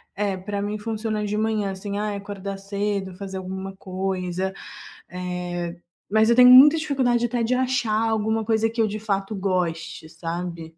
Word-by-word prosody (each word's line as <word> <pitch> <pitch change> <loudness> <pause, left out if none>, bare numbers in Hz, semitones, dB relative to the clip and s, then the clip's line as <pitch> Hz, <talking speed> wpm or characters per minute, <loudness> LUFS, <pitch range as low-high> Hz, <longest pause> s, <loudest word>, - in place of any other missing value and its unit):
é, 200 -1 -1
para 200 +2 -4
mim 210 +1 -2
funciona 215 0 -3
de 205 +1 -2
manhã 215 -2 0
assim, 200 +1 -5
ai 210 -1 -2
acordar 200 -1 -6
cedo, 200 -1 -3
fazer 195 -1 -6
alguma 190 +1 -6
coisa, 185 -1 -3 0.6
eh, 180 -1 -4 0.3
mas 220 +1 +4
eu 235 - +5
tenho 250 0 +8
muita 285 +5 +9
dificuldade 260 -6 +1
até 235 -1 -1
de 250 +2 +1
achar 235 -4 +1
alguma 220 0 0
coisa 225 0 +2
que 230 0 0
eu 215 - +2
de 215 +1 -4
fato 200 -1 -2
goste, 175 -5 -2
sabe? 170 0 -5
200 Hz, 165 wpm, -24 LUFS, 190-220 Hz, 0.6 s, muita